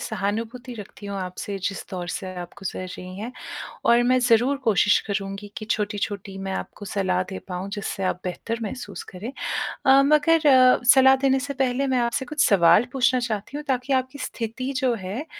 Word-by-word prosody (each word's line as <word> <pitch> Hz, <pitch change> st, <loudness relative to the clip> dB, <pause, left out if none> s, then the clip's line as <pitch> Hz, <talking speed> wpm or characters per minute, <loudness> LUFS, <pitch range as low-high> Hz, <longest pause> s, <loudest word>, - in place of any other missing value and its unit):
सहानुभूति 225 Hz, +5 st, -3 dB
रखती 205 Hz, -1 st, -10 dB
हूँ 200 Hz, 0 st, -4 dB
आपसे 185 Hz, +2 st, -5 dB
जिस 195 Hz, -, -6 dB
दौर 180 Hz, -2 st, -5 dB
से 190 Hz, -, -4 dB
आप 175 Hz, -, -7 dB
गुज़र 185 Hz, -1 st, -5 dB
रही 185 Hz, +1 st, -9 dB
हैं 235 Hz, +4 st, -5 dB, 0.5 s
और 235 Hz, +1 st, +5 dB
मैं 255 Hz, +1 st, +3 dB
ज़रूर 245 Hz, +3 st, +3 dB
कोशिश 205 Hz, -1 st, +4 dB
करूँगी 200 Hz, 0 st, -4 dB
कि 215 Hz, -, -5 dB
छोटी-छोटी 205 Hz, -2 st, -2 dB
मैं 195 Hz, 0 st, -4 dB
आपको 205 Hz, -, -6 dB
सलाह 185 Hz, -2 st, 0 dB
दे 190 Hz, -, -5 dB
पाऊँ 180 Hz, +2 st, -4 dB
जिससे 200 Hz, -2 st, -4 dB
आप 180 Hz, -1 st, -1 dB
बेहतर 225 Hz, +5 st, -4 dB
महसूस 225 Hz, +4 st, -6 dB
करें। 215 Hz, +8 st, -6 dB, 0.5 s
अ, 270 Hz, +1 st, +7 dB
मगर 305 Hz, +1 st, +4 dB
अ, 255 Hz, -2 st, +6 dB
सलाह 265 Hz, 0 st, +7 dB
देने 270 Hz, -1 st, +3 dB
से 280 Hz, +1 st, -4 dB
पहले 260 Hz, +2 st, 0 dB
मैं 255 Hz, -1 st, +2 dB
आपसे 265 Hz, +3 st, -2 dB
कुछ 300 Hz, +2 st, +1 dB
सवाल 175 Hz, +3 st, +6 dB
पूछना 255 Hz, -1 st, +3 dB
चाहती 235 Hz, +3 st, -3 dB
हूँ 300 Hz, -, -6 dB
ताकि 260 Hz, +1 st, 0 dB
आपकी 260 Hz, +3 st, -13 dB
स्थिति 255 Hz, +1 st, -4 dB
जो 255 Hz, -2 st, +2 dB
है 225 Hz, +11 st, -4 dB
225 Hz, 185 wpm, -24 LUFS, 195-260 Hz, 0.5 s, अ